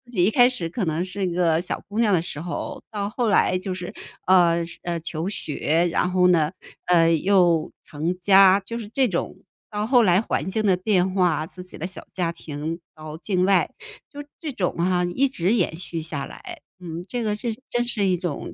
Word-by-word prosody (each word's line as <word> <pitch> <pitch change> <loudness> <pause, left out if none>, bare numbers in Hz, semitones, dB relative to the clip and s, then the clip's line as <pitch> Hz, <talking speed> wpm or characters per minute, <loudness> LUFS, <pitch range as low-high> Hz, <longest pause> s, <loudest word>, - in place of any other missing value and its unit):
己 180 - +3
一 205 - +3
开 245 +1 +6
始 220 -10 -1
可 195 +6 -3
能 160 +2 -1
是 190 0 -3
一 - - -2
个 170 -2 +2
小 180 - -3
姑 205 +3 -4
娘 225 -3 +3
的 175 -4 +2
时 150 -4 -5
候， 265 - -5
到 205 -2 -2
后 235 +3 -1
来 200 -3 +3
就 185 +1 -4
是， 180 -1 -7 0.3
呃， 170 -2 +4
是 170 - -10
呃， 170 -1 -3
求 165 +2 -4
学， 165 -2 0
然 180 - +1
后 180 0 +3
呢， 165 -4 +3 0.4
呃， 165 -2 +4
又 175 -2 +3
成 160 +5 -3
家， 195 +1 +6
就 230 +4 -6
是 215 -3 -8
这 265 +1 +2
种， 180 -6 -3 0.3
到 210 0 -2
后 245 +1 +5
来 185 -4 +4
环 190 -6 -2
境 215 +3 -1
的 190 -2 +4
变 185 -1 +1
化， 175 -5 +1
自 180 +2 -9
己 180 - -9
的 160 - -4
小 185 +1 -8
家 175 -3 -1
庭 160 0 -5 0.2
到 155 -1 -8
境 180 +2 0
外。 195 -1 +3 0.4
就 290 0 -7 0.2
这 315 -3 -4
种 195 -9 -1
哈， 180 +1 +1
一 255 +11 +1
直 185 -4 0
延 180 -8 +1
续 165 -1 -3
下 155 -3 -5
来， 355 -5 -10 0.2
嗯， 170 -1 -6
这 245 +1 -3
个 210 -1 0
是 225 +2 -3 0.2
真 240 0 0
是 225 -4 -1
一 185 -1 +2
种 175 -5 -5
180 Hz, 230 characters per minute, -23 LUFS, 170-205 Hz, 0.4 s, 开